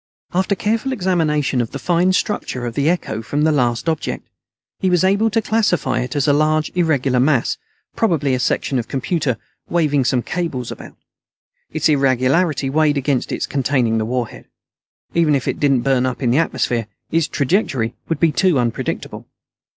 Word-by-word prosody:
After 190 +3 +1
careful 225 +7 -1
examination 160 - +1
of 115 - -5
the - - -3
fine 175 +1 +2
structure 130 - -2
of 120 - -4
the 140 +5 +1
echo 115 -11 -1
from 145 +6 -1
the 160 - +4
last 120 -2 0
object, 160 -2 -2 0.5
he 190 - +1
was 180 0 +3
able 200 +4 +3
to 225 +1 0
classify 215 -5 +1
it 125 +4 -4
as 145 -1 +1
a 145 - +5
large 155 +1 +1
irregular 140 -7 +1
mass, 135 -1 +2 0.4
probably 155 -11 +1
a 130 - 0
section 125 +2 0
of 115 - -4
computer, 140 - -1 0.3
waving 150 -5 +2
some 125 -1 +1
cables 160 -9 -3
about. - - -10 0.7
Its - - 0
irregularity 135 +2 +2
weighed 150 +1 +2
against 135 -2 -1
its - - -1
containing 130 -5 0
the 110 - -1
warhead. 120 0 -3 0.7
Even 160 -3 +3
if 135 - -2
it - - -1
didn't 135 -4 +3
burn 130 0 +2
up 130 +1 -4
in 120 - +2
the 135 - +3
atmosphere, 120 -8 0 0.2
its 165 -1 +2
trajectory 135 - 0 0.2
would 165 -3 -1
be 165 -2 +3
too 180 +1 +2
unpredictable. 120 -2 -3
145 Hz, 175 wpm, -19 LUFS, 125-170 Hz, 0.7 s, a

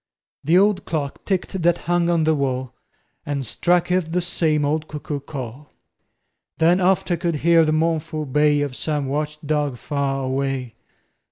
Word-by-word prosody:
The 165 +5 +4
old 195 -1 +3
clock 145 -4 -4
ticked 190 -1 -2
that 170 0 +3
hung 175 0 +2
on 170 -2 +2
the 160 0 +3
wall 130 -3 -2 0.5
And 145 -4 -3
struck 175 +9 +1
'th 180 -3 0
the 180 - +2
same 160 -4 +1
old 155 +2 -1
cuckoo 150 -1 -5
call; 140 0 -8 0.8
Then 170 +3 +3
oft 185 0 +2
I 175 - +2
could 170 0 -1
hear 170 -1 +6
the 155 - +1
mournful 155 -1 0
bay 150 +1 +2
Of 140 -3 -3
some 150 -1 -2
watch 150 +2 -2
dog 145 -3 0
far 135 0 -2
away. 130 -2 -2
155 Hz, 165 wpm, -22 LUFS, 140-170 Hz, 0.8 s, hear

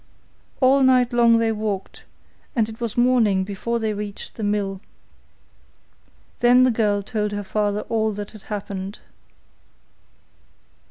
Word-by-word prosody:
All 265 +2 +5
night 255 -2 +4
long 235 -1 +5
they 230 0 +1
walked, 210 -3 -4 0.5
and 225 -3 +2
it 225 +1 -10
was 235 -2 -3
morning 235 -6 +3
before 205 +4 -3
they 220 -2 -1
reached 205 -1 -6
the - - -9
mill. 200 -2 -1 1.6
Then 245 +1 +5
the 255 - +4
girl 210 -3 +1
told 210 0 -2
her 205 0 -3
father 205 +1 -1
all 220 -1 -1
that 205 0 -6
had 215 - -13
happened. 200 -1 -5
215 Hz, 130 wpm, -22 LUFS, 205-235 Hz, 1.6 s, All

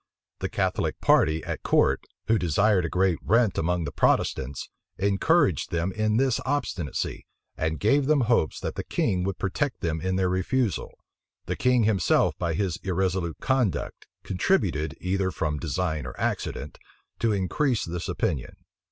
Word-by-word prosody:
The - - -2
Catholic - - -1
party 80 +1 +3
at - - -4
court, - - +2 0.2
who 110 -1 +2
desired 90 +2 +2
a - - -2
great 90 -2 +1
rent 115 0 +3
among 85 +1 0
the 70 - -4
Protestants, 65 0 0 0.3
encouraged 100 - +2
them 85 +2 -1
in 110 +1 0
this 130 -1 +2
obstinacy, 130 - -2 0.3
and 80 -1 -2
gave 140 - +3
them 150 -2 +4
hopes 115 - +1
that - - -3
the - - -4
king 90 -1 0
would 95 -1 -2
protect 120 +7 -2
them 80 -2 -1
in 95 0 -1
their 95 0 +2
refusal. 95 +5 -1 0.5
The - - -2
king 125 -2 +3
himself, 105 -5 +2
by 85 -2 -1
his 95 -2 -1
irresolute 95 -2 -1
conduct, 130 -7 -1 0.2
contributed, 90 - 0
either 95 +1 0
from 75 -4 -2
design 80 -2 -2
or 60 - -9
accident, 70 - -3 0.4
to 115 - +2
increase 105 +6 0
this 85 0 -4
opinion. 65 -4 -2
95 Hz, 150 wpm, -26 LUFS, 80-110 Hz, 0.5 s, them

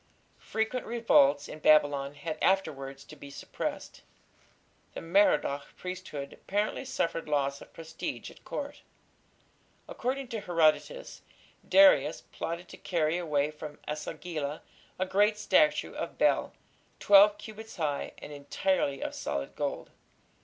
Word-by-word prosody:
Frequent 220 +3 -2
revolts 145 -12 +4
in 155 - -9
Babylon 145 -2 +3
had 155 +1 -5
afterwards 140 -8 0
to 155 - -13
be 140 -1 -11
suppressed. 140 - -6 0.9
The - - -4
Merodach 165 -5 +2
priesthood 180 -6 -6
apparently 205 +6 -2
suffered 165 -9 -2
loss 140 -1 0
of - - -13
prestige 165 0 -6
at - - -18
Court. - - -6 1.1
According 260 +1 -3
to 225 - -3
Herodotus, 175 - +1 0.5
Darius 290 0 +6
plotted 170 +2 -5
to - - -11
carry 165 -2 0
away 150 -3 0
from 150 -1 -9
E - - -2
sagila 155 -1 -5 0.4
a 185 - 0
great 205 +3 +3
statue 300 +8 +3
of - - -5
Bel - - +2 0.5
"twelve 205 +1 +7
cubits 220 +1 -10
high 150 -5 -2
and 150 - -9
entirely 145 0 -1
of - - -4
solid 70 0 -4
gold". - - -3
165 Hz, 125 wpm, -29 LUFS, 145-205 Hz, 1.1 s, twelve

